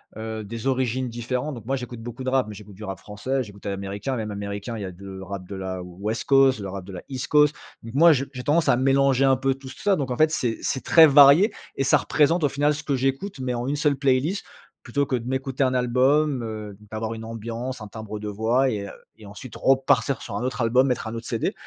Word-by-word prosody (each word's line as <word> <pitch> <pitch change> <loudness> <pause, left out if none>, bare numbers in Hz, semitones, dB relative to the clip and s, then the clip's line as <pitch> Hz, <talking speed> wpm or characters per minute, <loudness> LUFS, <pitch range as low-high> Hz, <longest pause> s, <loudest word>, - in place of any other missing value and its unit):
heu, 110 0 -5
des 115 +4 -5
origines 130 -1 0
différentes, 125 +4 -3
donc 115 -2 -10
moi 135 +2 0
j'écoute 125 -2 -7
beaucoup 120 +2 -7
de 130 - -1
rap, 130 -4 +2
mais 105 - -7
j'écoute 105 -1 -12
du 105 - -11
rap 95 -2 -5
français, 130 +6 -3
j'écoute 100 -4 -10
de 100 - -3
l'américain. 100 +6 -4
Même 110 -2 -3
américain, 100 +3 -5
il - - -6
y - - -4
a 95 - -6
de 95 +1 -10
rap 95 -1 -7
de 100 - -7
la 95 -1 -4
West 100 +6 -4
Coast, 135 -4 +5
le 100 -1 -5
rap 95 -1 -6
de 95 - -10
la 90 - -7
East 130 -2 -4
Coast. 150 0 +4 0.3
Donc 115 +3 -10
moi, 165 +2 +7
je 135 0 -1
j'ai 125 -2 -7
tendance 155 +2 +2
à 120 - +4
mélanger 135 0 +3
un 135 -1 +4
peu 135 0 0
tout 135 -1 -11
ça. 195 +8 0
Donc 135 -5 -3
en 125 - -2
fait, 155 0 +5
c'est 120 -7 -1
c'est 130 - -2
très 160 -1 +7
varié 145 - +7 0.2
et 135 - 0
ça 135 - +5
représente, 160 +2 +2
au 145 - +3
final, 145 +1 +1
ce 155 - -7
que 140 - 0
j'écoute, 135 +6 -2
mais 125 -1 -2
en 120 +1 -3
une 145 - 0
seule 145 -1 +2
playlist, 140 +7 +1 0.4
plutôt 140 -1 0
que 130 - -1
de 120 0 -4
m'écouter 130 +1 -1
un 130 -1 +1
album, 130 +3 +2
heu, 105 -2 -6 0.2
d'avoir 110 +1 -3
une 110 0 -7
ambiance, 115 +2 -5
un 105 - -7
timbre 110 0 -7
de 105 - -6
voix 115 +6 +1
et 100 -3 -3
heu, - - -8 0.3
et 105 -2 -13
ensuite 110 +5 -10
repartir 135 -2 +2
sur 105 - -6
un 110 - -2
autre 125 -1 -2
album, 125 +4 +3
mettre 125 -3 -1
un 110 - -5
autre 115 0 -7
CD. 115 - -1
125 Hz, 260 wpm, -24 LUFS, 110-135 Hz, 0.4 s, moi